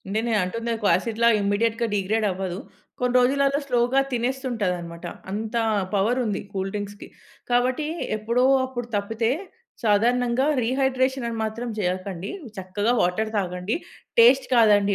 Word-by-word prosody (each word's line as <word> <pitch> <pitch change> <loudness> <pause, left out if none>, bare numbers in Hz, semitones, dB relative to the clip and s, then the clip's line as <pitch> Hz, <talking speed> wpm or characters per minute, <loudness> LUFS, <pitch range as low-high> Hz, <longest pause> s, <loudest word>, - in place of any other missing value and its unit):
నేను 230 +1 0
అంటుంది 230 +6 -4
ఒక 210 - -5
యాసిడ్‌లా 230 +5 +1
ఇమ్మీడియేట్‌గా 225 +3 +1
డీగ్రేడ్ 210 +2 0
అవ్వదు. 185 -1 -4 0.4
కొన్ని 250 0 0
రోజులలో 275 +3 +2
స్లోగా 245 +2 +2
తినేస్తుంటాదన్నమాట. 220 -10 -2 0.3
అంత 220 +3 -4 0.4
పవర్ 220 +6 +2
ఉంది 210 - -2
కూల్ 195 0 -2
డ్రింక్స్‌కి. 205 0 -6 0.4
కాబట్టి 250 +5 +1 0.3
ఎప్పుడో 235 +4 +1 0.2
అప్పుడు 245 -2 -5
తప్పితే, 225 +3 0 0.5
సాధారణంగా 240 +4 +2 0.2
రీహైడ్రేషన్ 260 +1 +1
అని 230 - -4
మాత్రం 230 +3 -4
జేయకండి. 185 0 -3 0.3
చక్కగా 190 +5 -1
వాటర్ 215 +5 0
తాగండి. 180 +2 -2 0.4
టేస్ట్ 255 +3 +6
కాదండి 205 -3 +5
225 Hz, 120 wpm, -24 LUFS, 200-245 Hz, 0.5 s, టేస్ట్